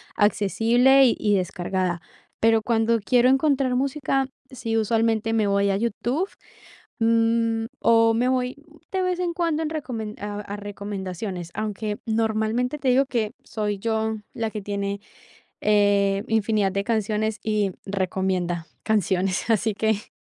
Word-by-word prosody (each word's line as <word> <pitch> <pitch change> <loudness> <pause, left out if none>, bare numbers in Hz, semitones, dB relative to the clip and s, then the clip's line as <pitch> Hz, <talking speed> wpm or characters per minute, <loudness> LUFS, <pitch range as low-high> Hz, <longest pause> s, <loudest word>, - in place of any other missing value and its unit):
accesible 230 +6 +4
y 240 - +3
y 210 -1 +2
descargada. 180 -1 -1 0.4
Pero 225 0 +4
cuando 230 0 +2
quiero 245 +4 +3
encontrar 270 -2 +2
música, 270 0 0 0.2
sí, 230 -3 -3
usualmente 225 0 +1
me 220 -2 +2
voy 200 0 +2
a 195 - +1
YouTube, 240 - -1 0.7
mm, 230 0 +2 0.2
o 230 0 +5
me 240 +2 +1
voy 255 -1 0 0.4
de 380 -1 0
vez 365 -1 -1
en 350 -1 -1
cuando 330 -2 0
en 310 - -2
recomen 230 -8 -4
a 205 0 -4
a 205 0 -6
recomendaciones, 195 -3 -5
aunque 210 0 -3
normalmente 225 +4 0
te 270 - -3
digo 260 +2 +4
que 220 -5 -1
soy 210 -2 -3
yo 220 0 -1 0.2
la 225 -1 -2
que 210 - -5
tiene, 200 0 -3 0.6
eh, 200 -1 +3
infinidad 215 -3 +1
de 200 0 -1
canciones 215 -1 0
y 210 -3 0
recomienda 185 -3 -1 0.2
canciones, 195 -2 0
así 220 0 +2
que. 220 0 -1
220 Hz, 140 wpm, -24 LUFS, 200-235 Hz, 0.7 s, o